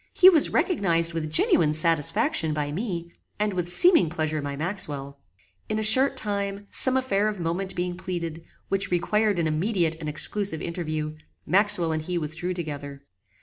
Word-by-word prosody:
He 370 - +8
was 315 -5 +4
recognized 170 - +1
with 160 -2 -3
genuine 155 0 +3
satisfaction 160 0 0
by 145 -1 -3
me, 170 -2 -4 0.3
and 210 -1 0
with 180 -1 -2
seeming 325 - +6
pleasure 155 -2 -2
by 140 0 -5
Maxwell. 145 -5 -4 0.5
In 215 - -1
a 220 - -2
short 260 +5 +5
time, 200 -2 -2
some 260 0 +4
affair 215 -6 0
of 210 -3 -4
moment 180 +3 -3
being 180 0 -3
pleaded, 170 -3 -6 0.2
which 195 0 -2
required 210 +3 0
an 170 - 0
immediate 165 +1 -1
and 155 -2 -5
exclusive 195 +3 -2
interview, 155 -3 -4 0.3
Maxwell 195 -4 +2
and 155 0 -2
he 175 +3 -4
withdrew 165 +3 -4
together. 145 -4 -6
175 Hz, 160 wpm, -25 LUFS, 155-200 Hz, 0.5 s, He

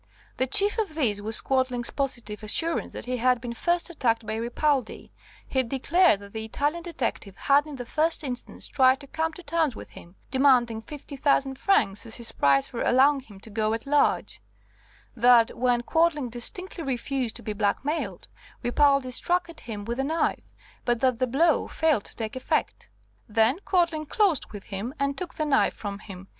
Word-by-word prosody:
The 260 - +1
chief 405 - +3
of 395 -8 -2
these 220 -10 +1
was 215 +1 +1
Quadling's 255 -2 0
positive 245 -6 -3
assurance 325 +11 -1
that - - -7
he 250 0 -2
had 250 0 +2
been 235 0 -5
first 345 +8 0
attacked 235 -9 0
by 215 - -3
Ripaldi; 250 +2 -1 0.4
he 260 - +1
declared 270 - +3
that 200 0 -12
the 220 -1 -4
Italian 290 +9 -1
detective 250 - -4
had 285 +2 +3
in 300 - -7
the 245 -2 -6
first 315 +6 0
instance 250 -3 -6
tried 260 0 +4
to - - -10
come 320 +3 -2
to 360 - -11
terms 320 -4 0
with - - -9
him, 175 +2 -14 0.2
demanding 250 -4 +3
50,000 275 +1 -1
francs 235 - +1
as 225 - -4
his 235 -2 -5
price 140 -1 +3
for 235 - -6
allowing 275 +3 +4
him 210 -7 -14
to 220 - -12
go 215 +1 0
at 225 - -7
large; 290 +1 +1 0.7
that 240 -1 +5
when 245 -1 +1
Quadling 320 -3 +1
distinctly 335 +9 -4
refused 260 -2 -2
to - - -6
be 215 - -3
black 205 +4 0
mailed, 285 - -3 0.4
Ripaldi 275 +1 +3
struck 345 +6 0
at 335 - -12
him 210 -4 -7
with 235 +3 -3
a - - +1
knife, 320 +4 -1 0.3
but 240 -1 +1
that 255 -3 +2
the 255 - +1
blow 310 +6 +2
failed 315 -10 +1
to - - -10
take 220 0 -5
effect. 260 - -2 0.4
Then 225 - +3
Quadling 335 -5 +1
closed 385 - +1
with 205 -2 -8
him 210 +7 -5
and 280 0 0
took 360 +1 -6
the 310 - -1
knife 290 -2 +2
from 200 -1 -6
him. 190 -2 -10
260 Hz, 185 wpm, -26 LUFS, 230-300 Hz, 0.7 s, that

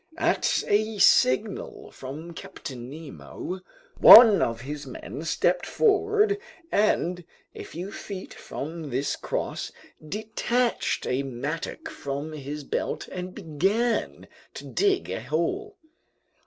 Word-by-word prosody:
At - - +1
a 215 +1 +1
signal 415 - +2
from 150 +6 -8
Captain 125 -6 -8
Nemo, 160 +4 -7 0.4
one 225 -4 +10
of 115 0 -1
his 145 +2 -6
men 130 +1 -7
stepped 175 +3 +1
forward 420 -1 +2 0.3
and, 180 -4 +1 0.3
a - - -8
few 180 +5 -7
feet 195 -3 -7
from 160 +1 -7
this 135 +2 -1
cross, - - -4 0.3
detached 220 +7 -1
a 125 +2 0
mattock 130 -3 -5
from 140 +3 -5
his 145 0 -6
belt - - -3
and 180 0 -6
began 200 +7 -1 0.3
to - - -8
dig 400 -2 +1
a - - -3
hole. 170 - -2
175 Hz, 115 wpm, -26 LUFS, 140-225 Hz, 0.4 s, one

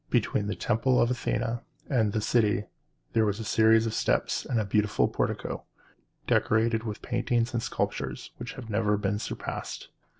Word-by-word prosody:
Between 105 - +1
the 105 - -2
temple 125 +3 +2
of 120 - +3
Athene 120 -1 -1 0.3
and 115 -6 +2
the 110 - -1
city 105 -2 +2 0.5
there 115 - +4
was 105 0 0
a - - -3
series 110 +1 +4
of 110 - -2
steps - - +1
and 110 -5 0
beautiful 105 +1 +2
porticoes, - - -2 0.7
decorated 110 +1 +2
with 110 -2 -5
paintings 120 -1 0
and 120 - 0
sculptures, - - -3
which 120 +1 -6
have 130 -4 -8
never 105 -1 +1
been 100 0 -1
surpassed. - - -5
110 Hz, 160 wpm, -28 LUFS, 105-120 Hz, 0.7 s, there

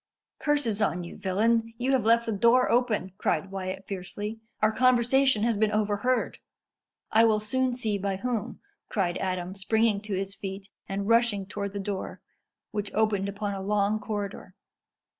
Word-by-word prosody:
"Curses 275 -8 +1
on 180 -4 +1
you, 170 - -8
villain! 225 +4 +1
you 250 +3 0
have 260 -5 +2
left 230 +1 +4
the 225 - -1
door 235 +5 +4
open," 230 -6 +1
cried 175 +4 0
Wyat 190 0 -5
fiercely. 205 +3 -5 0.2
"Our 215 0 +3
conversation 255 0 +3
has 230 -3 +1
been 215 -1 +3
overheard." 215 +4 0 0.7
"I 225 - +6
will 215 -1 +3
soon 260 +3 0
see 215 -5 -1
by 195 0 -1
whom," 230 +2 -3 0.3
cried 180 -4 0
Adam, 185 -1 -2
springing 210 +1 +1
to 210 -2 -4
his 195 +1 -3
feet, 195 -1 -7 0.2
and 200 +1 -2
rushing 230 -4 +3
towards 200 0 -5
the 200 - -3
door, 195 -1 -4 0.5
which 205 -1 -3
opened 205 -2 +1
upon 200 0 -3
a 195 - -4
long 205 +1 +1
corridor. 205 -3 -5
210 Hz, 160 wpm, -27 LUFS, 195-230 Hz, 0.7 s, I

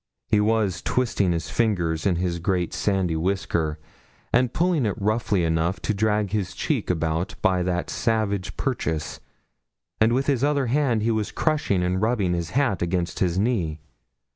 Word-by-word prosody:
He 105 - +2
was 105 -4 +1
twisting 115 -7 +1
his 85 -2 -3
fingers 85 -8 0
in 90 - +2
his 85 0 -1
great 90 0 -1
sandy 95 -5 0
whisker, 85 -3 -1 0.6
and 125 0 +3
pulling 165 -5 +1
it 100 - -3
roughly 105 -2 +1
enough 80 +3 0
to 110 - 0
drag 105 -1 +1
his 105 -3 -2
cheek - - -1
about 80 +1 -1
by 95 -3 +3
that 90 0 -1
savage 105 -4 -1
purchase; 80 -2 -2 0.8
and 110 +1 +4
with 130 +3 +1
his 135 -3 +1
other 145 -2 +2
hand 125 -3 +1
he 115 - +2
was 110 -2 -1
crushing 150 - 0
and 90 +1 0
rubbing 105 -5 +1
his 85 -2 -2
hat 130 -7 +1
against 85 0 -1
his 90 -1 +1
knee. 95 -8 0
100 Hz, 165 wpm, -24 LUFS, 85-115 Hz, 0.8 s, and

